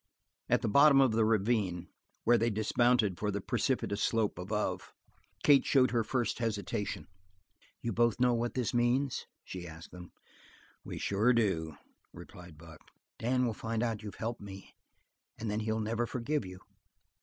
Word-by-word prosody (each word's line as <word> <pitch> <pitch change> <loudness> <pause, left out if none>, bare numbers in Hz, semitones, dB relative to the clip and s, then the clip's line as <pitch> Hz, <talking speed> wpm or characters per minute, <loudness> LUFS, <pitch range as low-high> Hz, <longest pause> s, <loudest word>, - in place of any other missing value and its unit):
At - - +2
the - - +1
bottom 140 +5 +6
of 135 -3 +5
the 110 0 +2
ravine, 105 -5 +1 0.4
where 120 0 +4
they 115 +2 +2
dismounted 110 -2 +2
for 105 - -1
the 100 0 -2
precipitous 100 +1 -1
slope 110 -5 0
above, 105 +4 -3 0.5
Kate 145 -2 +6
showed 130 -2 +3
her 115 -2 +1
first 125 +1 -1
hesitation. 105 -3 -3 0.8
"You 115 - -2
both 120 +2 +2
know 125 -1 +4
what 120 +2 -2
it 125 -4 -1
means?" 120 +3 +1 0.2
she 90 -2 -7
asked 80 0 -11
them. 90 -1 -11 0.7
"We - - -7
sure 105 +5 +2
do," 85 -9 0 0.4
replied 90 -3 -12
Buck. 80 0 -13 0.4
"Dan 125 +2 +1
will 115 - -1
find 115 +2 -3
out 115 -2 -1
that - - -15
you've 105 - -7
helped 115 +1 -4
me, 95 -1 -10 0.6
and 110 -1 -3
then 105 - -1
he'll 110 0 -1
never 115 +2 -1
forgive 125 +1 -2
you. 90 0 -9
110 Hz, 165 wpm, -31 LUFS, 100-120 Hz, 0.8 s, bottom